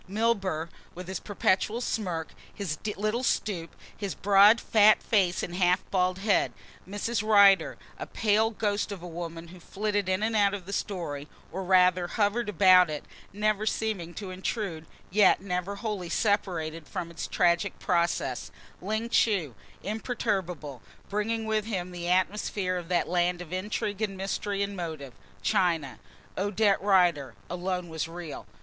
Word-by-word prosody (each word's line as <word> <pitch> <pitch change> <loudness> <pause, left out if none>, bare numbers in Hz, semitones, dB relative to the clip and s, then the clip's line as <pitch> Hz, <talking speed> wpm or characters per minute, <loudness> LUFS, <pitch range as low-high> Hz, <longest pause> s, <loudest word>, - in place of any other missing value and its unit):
Milburgh, 195 -6 0 0.2
with 180 0 -8
his 190 - -4
perpetual 205 +2 0
smirk, 180 -9 -2 0.2
his 180 -7 -4 0.2
little 215 +4 0
stoop, 185 -9 -1 0.2
his 200 -3 -4
broad, 205 +3 +6
fat 215 -2 +5
face 185 -5 +2
and 175 - -4
half 180 0 +2
bald 185 -1 +1
head; 200 +1 +1 0.4
Mrs. 205 +2 -1
Rider, 200 -2 +5 0.2
a - - -5
pale 220 +1 +2
ghost 210 -2 -1
of 190 -4 -7
a - - -6
woman 170 0 -7
who 180 +1 -12
flitted 205 +2 -2
in 185 +2 0
and 225 +1 0
out 200 -1 +3
of 190 -3 -8
the 200 - -6
story, 155 -9 -3 0.2
or 190 +3 -4
rather 180 -1 +4
hovered 210 +4 0
about 185 -4 +6
it, 150 -1 -5 0.3
never 215 +1 0
seeming 200 -7 -2
to 195 -3 -6
intrude, 185 -4 -4 0.2
yet 205 0 +5
never 185 +1 -3
wholly 200 -4 -4
separated 165 -7 -1
from 175 -3 -5
its 165 - -5
tragic 175 +3 +1
process; 170 -8 0 0.3
Ling 220 +4 -2
Chu, 200 - +2 0.3
imperturbable, 195 - -3 0.3
bringing 220 +2 -1
with 215 -1 0
him 185 -5 -3
the 175 -1 -4
atmosphere 185 0 0
of 175 -2 -5
that 175 0 +1
land 175 0 +1
of 180 -1 -8
intrigue 205 +2 -3
and 200 -3 -2
mystery 200 +1 -2
and 200 0 -4
motive, 160 -7 -6 0.3
China. 160 - +1 0.4
Odette 205 +1 +2
Rider 175 -8 +3 0.2
alone 180 0 -2
was 160 -1 -3
real. 165 -2 -8
190 Hz, 150 wpm, -28 LUFS, 175-210 Hz, 0.4 s, broad